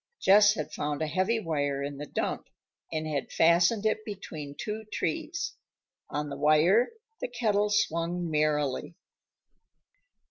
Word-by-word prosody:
Jess 205 Hz, +2 st, +6 dB
had -, -, -4 dB
found 150 Hz, +1 st, -2 dB
a -, -, +1 dB
heavy 185 Hz, +9 st, +1 dB
wire 145 Hz, -6 st, -1 dB
in 140 Hz, 0 st, -5 dB
the 150 Hz, -, -6 dB
dump, -, -, -3 dB, 0.4 s
and 155 Hz, -1 st, -2 dB
had 150 Hz, -3 st, -3 dB
fastened 175 Hz, +6 st, +4 dB
it 215 Hz, 0 st, +1 dB
between 160 Hz, -9 st, -7 dB
two 215 Hz, +1 st, -4 dB
trees. 330 Hz, +1 st, -2 dB, 0.6 s
On 150 Hz, 0 st, -3 dB
the 140 Hz, -, -5 dB
wire 155 Hz, -, +4 dB, 0.3 s
the -, -, -2 dB
kettle 210 Hz, -, +1 dB
swung 175 Hz, -4 st, 0 dB
merrily. 150 Hz, 0 st, 0 dB
170 Hz, 135 wpm, -28 LUFS, 150-210 Hz, 0.6 s, Jess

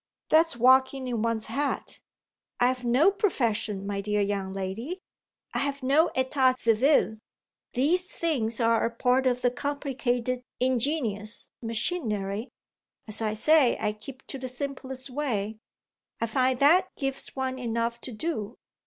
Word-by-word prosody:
That's 320 Hz, -3 st, +4 dB
walking 260 Hz, +2 st, +4 dB
in 235 Hz, -3 st, -1 dB
one's 230 Hz, -1 st, -1 dB
hat! 285 Hz, +1 st, -2 dB, 0.6 s
I've 250 Hz, +1 st, +2 dB
no 255 Hz, +10 st, +4 dB
profession, 225 Hz, -, -1 dB
my 200 Hz, 0 st, -2 dB
dear 210 Hz, +1 st, -1 dB
young 200 Hz, -1 st, -1 dB
lady. 195 Hz, -, -4 dB, 0.5 s
I've 280 Hz, -1 st, -2 dB
no 295 Hz, +6 st, +4 dB
état 260 Hz, 0 st, +2 dB
civil. 230 Hz, -1 st, +3 dB, 0.5 s
These 345 Hz, +9 st, +2 dB
things 255 Hz, -9 st, -1 dB
are 230 Hz, -1 st, +3 dB
a -, -, +2 dB
part 250 Hz, +2 st, +2 dB
of 250 Hz, 0 st, 0 dB
the 245 Hz, -, +3 dB
complicated 255 Hz, -3 st, -2 dB, 0.2 s
ingenious 245 Hz, -4 st, 0 dB
machinery. 225 Hz, -, -2 dB, 0.6 s
As 215 Hz, +1 st, -3 dB
I 215 Hz, -1 st, 0 dB
say, 270 Hz, +3 st, +4 dB
I 210 Hz, 0 st, 0 dB
keep 260 Hz, +5 st, -11 dB
to 270 Hz, -, -6 dB
the 255 Hz, -, -4 dB
simplest 265 Hz, 0 st, -5 dB
way. 220 Hz, -6 st, -2 dB, 0.6 s
I -, -, +1 dB
find 255 Hz, +2 st, +1 dB
that 330 Hz, +8 st, +5 dB
gives 270 Hz, -1 st, -3 dB
one 260 Hz, -1 st, -2 dB
enough 235 Hz, 0 st, -2 dB
to 255 Hz, -, -6 dB
do. 230 Hz, -3 st, -4 dB
250 Hz, 135 wpm, -27 LUFS, 225-275 Hz, 0.6 s, that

